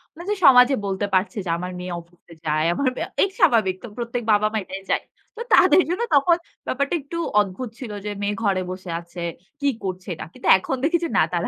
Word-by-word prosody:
মানে 345 - -9
যে - - +1
সমাজে 255 0 +7
বলতে 195 +1 -1
পারছে 185 +2 +1
যে - - -4
আমার 180 +1 -5
মেয়ে 180 -1 -5
অফিসে 170 0 -20
যায়। 155 +1 +1
আমার 270 +8 -1
মেয়ে - - -3 0.2
এই 390 - +1
স্বাভাবিক। 215 -6 +4
তো 240 - -6
প্রত্যেক 240 0 -3
বাবা-মা 215 +1 +2
এটাই 195 +1 -7
যায়। - - +1 0.3
তো 455 - -7
তাদের - - +7
জন্য 365 +5 -1
তখন 335 +5 +4 0.3
ব্যাপারটা 280 +5 -1
একটু 285 +5 -7 0.2
অদ্ভুত 205 +5 -2
ছিল 240 -5 -6
যে 210 - -2
মেয়ে 205 0 -1
ঘরে 195 -2 +1
বসে 185 -1 -8
আছে, 170 +1 -12 0.4
কি 285 - 0 0.2
করছে 185 -1 -5
এটা। - - -7
কিন্তু 255 - -7
এখন 265 +7 -3
দেখি 335 +4 +3
যে - - -3
না - - +6
তারা - - 0
210 Hz, 215 wpm, -23 LUFS, 185-270 Hz, 0.4 s, সমাজে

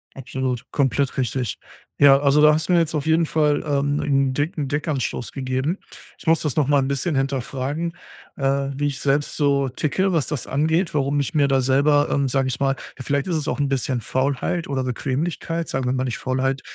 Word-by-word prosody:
Absolut, 130 -1 -3
komplett 135 -1 +1
richtig. 125 -2 -1 0.4
Ja, 135 -1 +7
also 145 +1 +3
da 150 0 +7
hast 160 +3 -1
du - - +4
mir 175 - +5
jetzt 160 -1 0
auf 150 -1 -2
jeden 160 +1 +3
Fall, 150 -2 +1
ähm, 145 0 0
'n 135 -2 +1
dicken 145 +1 -2
Denkanstoß 145 -4 -2
gegeben. 130 +6 -2 0.4
Ich - - -16
muss 165 0 +4
das 150 -5 -2
noch 145 -4 +2
mal 145 -1 +4
'n 135 - 0
bisschen 140 +4 -1
hinterfragen, 135 +4 -2 0.4
äh, 140 0 0
wie 145 +1 0
ich 140 -1 -4
selbst 140 +1 0
so 140 -2 +2
ticke, 170 +9 0
was 160 -5 +1
das 150 -5 -3
angeht, 160 +6 +1
warum 145 0 +1
ich 140 +3 -2
mir 145 -3 +3
da 135 -1 +2
selber, 145 +3 +3
ähm, 140 -1 +1
sage 135 0 +1
ich 125 - -3
mal 135 0 +1 0.2
ja, 130 - -7
vielleicht 140 +3 -1
ist 175 - 0
es 155 -1 -2
auch 145 - -2
'n 145 - +1
bisschen 130 -2 -1
Faulheit 135 +8 -1
oder 135 -2 -1
Bequemlichkeit, 160 +6 -2
sagen 135 -1 -2
wir 125 - +1
mal 130 0 0
nicht 125 -4 -3
Faulheit 135 +1 -1
140 Hz, 210 wpm, -22 LUFS, 135-150 Hz, 0.4 s, Ja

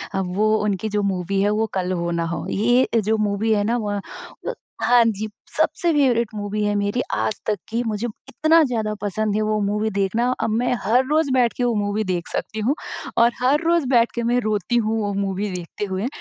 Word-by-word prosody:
अब 185 -2 -2
वो, 215 +2 +2
उनकी 210 0 -1
जो 210 0 0
मूवी 185 +2 -1
है 205 - +3
वो 225 - +2
कल 185 -1 -1
हो 170 -2 -1
ना 170 -1 -1
हो। - - -4
ये, 240 +5 +3
अ, 230 - +1
जो 220 +1 +1
मूवी 215 +2 +1
है 205 -1 +2
ना 230 +3 +1
व 205 -1 -2 0.5
अ, - - -1 0.3
हाँ 245 -1 +6
जी। 215 -1 -1 0.3
सबसे 345 -3 +2
फ़ेवरेट 250 -6 +3
मूवी 210 0 -2
है 205 0 +1
मेरी 205 +4 0
आज - - 0
तक 210 - 0
की, 230 +2 -1
मुझे 215 +2 -2 0.2
इतना 320 +1 +4
ज़्यादा 225 -6 -1
पसंद 205 +1 -1
है 215 - +1
वो 215 0 0
मूवी 210 +2 0
देखना। 200 +5 +1 0.2
अब - - 0
मैं 235 +3 +1
हर 240 +6 +3
रोज़ 310 -1 +2
बैठ 245 -3 +3
के 245 - 0
वो 240 -1 +2
मूवी 205 +1 0
देख 180 -4 -2
सकती 220 - -4
हूँ, 240 +7 +1 0.4
और 235 +1 +5
हर 275 +5 +3
रोज़ 335 -3 +3
बैठ 235 -3 +4
के 235 - -1
मैं 245 +1 +3
रोती 215 0 -1
हूँ, 225 -1 +1
वो 205 -1 -1
मूवी 200 +1 -2
देखते 180 +3 -5
हुए। 190 +3 -2
215 Hz, 220 wpm, -22 LUFS, 200-235 Hz, 0.5 s, हाँ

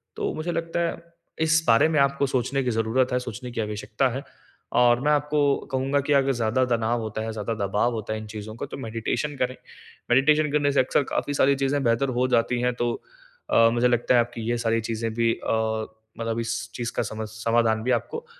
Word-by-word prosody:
तो - - -2
मुझे 160 +3 -3
लगता 165 0 -2
है - - -4 0.4
इस 160 0 +3
बारे 115 +6 +5
में 155 -2 +2
आपको 140 0 +2
सोचने 135 +1 0
की 125 - 0
ज़रूरत 120 +4 +1
है, 125 - +2
सोचने 125 0 -7
की 115 - -2
आवश्यकता 105 +4 -1
है। 135 - -4 0.6
और 120 -1 +5
मैं 150 +2 +2
आपको 150 0 +1 0.3
कहूँगा 135 +2 +1
कि 145 - +3
अगर 135 -1 +3
ज़्यादा 120 0 +1
तनाव 120 -1 0
होता 110 -1 -4
है, 110 0 -3
ज़्यादा 110 +1 -3
दबाव 105 +5 +1
होता 110 -1 -4
है 110 - -3
इन 110 - -8
चीज़ों 110 +1 -7
का - - -5
तो - - -5
मेडिटेशन 120 +4 -3
करें। 130 0 -1 0.6
मेडिटेशन 150 +4 +4
करने 145 -1 +2
से 140 - +2
अक्सर 130 +2 +2
काफ़ी 145 - -1
सारी 140 0 +3
चीज़ें 140 +1 0
बेहतर 120 +3 +2
हो 130 - +3
जाती 120 +1 0
हैं 125 0 +1
तो 120 -1 0 0.6
अ, 115 0 +6
मुझे 120 +1 +3
लगता 120 +1 +2
है - - +6
आपकी 120 0 -5
ये 120 - +1
सारी 115 0 +2
चीज़ें 115 0 -2
भी 115 0 +2
अ, - - -3 0.7
मतलब 115 0 -2
इस 115 0 -3
चीज़ 120 -1 -3
का - - +1
समा 110 0 -5
समाधान 115 -1 +1
भी 125 - 0
आपको 465 +1 -8
120 Hz, 215 wpm, -25 LUFS, 115-140 Hz, 0.7 s, अ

